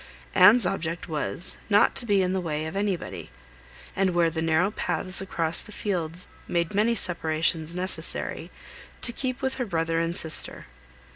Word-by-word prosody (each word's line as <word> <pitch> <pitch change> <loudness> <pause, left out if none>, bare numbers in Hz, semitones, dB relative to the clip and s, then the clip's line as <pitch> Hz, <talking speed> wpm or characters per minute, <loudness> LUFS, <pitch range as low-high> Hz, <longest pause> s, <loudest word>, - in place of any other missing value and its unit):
Anne's 205 +4 +7
object 165 0 -3
was, 160 +2 -3
not 205 0 +4
to 240 - 0
be 200 -2 +3
in 180 0 -1
the 190 - -1
way 155 -2 -3
of 160 - -6
anybody; 200 -3 -3 0.7
and 190 -2 +1
where 170 -1 +3
the 160 0 -3
narrow 165 +4 +2
paths 185 -3 -1
across 170 -4 0
the - - -11
fields 180 -5 -3 0.2
made 170 +2 -1
many 220 +4 +2
separations 165 -3 0
necessary, 185 +1 0 0.5
to 235 - +5
keep 260 +1 -4
with 265 0 -1
her - - 0
brother 165 -2 -1
and 165 +1 0
sister. 160 - +3
180 Hz, 160 wpm, -26 LUFS, 165-200 Hz, 0.7 s, Anne's